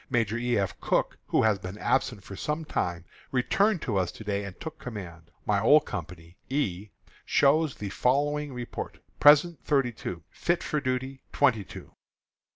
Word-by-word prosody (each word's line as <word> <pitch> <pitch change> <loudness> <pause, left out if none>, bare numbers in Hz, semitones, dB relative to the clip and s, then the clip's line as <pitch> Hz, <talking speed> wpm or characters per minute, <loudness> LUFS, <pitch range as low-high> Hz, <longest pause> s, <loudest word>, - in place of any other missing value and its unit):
Major 115 -4 +1
E. 120 0 0
F. 95 -2 -1
Cooke, - - 0
who - - +2
has 110 -3 +3
been 90 +2 -7
absent 120 -3 0
for 100 - -9
some 150 +8 -3
time, 85 - -2 0.3
returned 195 - +2
to 110 -6 -1
us 90 -2 0
to - - -10
day 100 -1 -1
and 100 -2 -8
took 160 0 -7
command. 85 -8 -8 0.2
My 100 -1 +2
old 150 +6 +6
company, 85 -2 -7
E, 105 -8 -1 0.3
shows 150 +1 +3
the 105 - -5
following 145 +6 +1
report: 125 -2 -6 0.2
Present, 150 +3 +6
thirty 135 -4 +2
two; 90 -7 -6
fit 175 0 0
for 150 -2 -1
duty, 130 0 -2
twenty 125 -8 +3
two. - - -11
120 Hz, 165 wpm, -28 LUFS, 100-145 Hz, 0.3 s, old